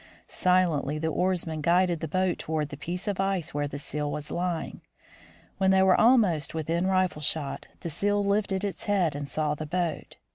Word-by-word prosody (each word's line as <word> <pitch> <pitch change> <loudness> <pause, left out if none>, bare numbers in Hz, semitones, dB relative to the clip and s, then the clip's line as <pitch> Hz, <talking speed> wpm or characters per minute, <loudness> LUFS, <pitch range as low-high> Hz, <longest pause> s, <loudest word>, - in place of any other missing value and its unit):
Silently 170 -6 +1
the 160 +1 -1
oarsmen 170 -2 -1
guided 175 +1 +3
the 160 - -3
boat 185 +2 0
toward 155 -2 -2
the 145 - -7
piece 175 +7 -5
of 200 -2 -1
ice 195 -4 -1
where 145 0 -1
the 145 - -6
seal 145 0 -3
was 150 0 -5
lying. 175 -2 -3 0.8
When 190 0 +3
they 190 0 +5
were 190 -1 +5
almost 215 - +3
within 165 +3 0
rifle 185 -4 +1
shot, 150 -1 -2
the 170 - -4
seal 205 +5 +1
lifted 200 -1 0
its 200 -2 -4
head 190 -6 +2
and 145 -1 -4
saw 150 0 -1
the 155 +1 -6
boat. 170 0 -3
175 Hz, 185 wpm, -27 LUFS, 150-190 Hz, 0.8 s, they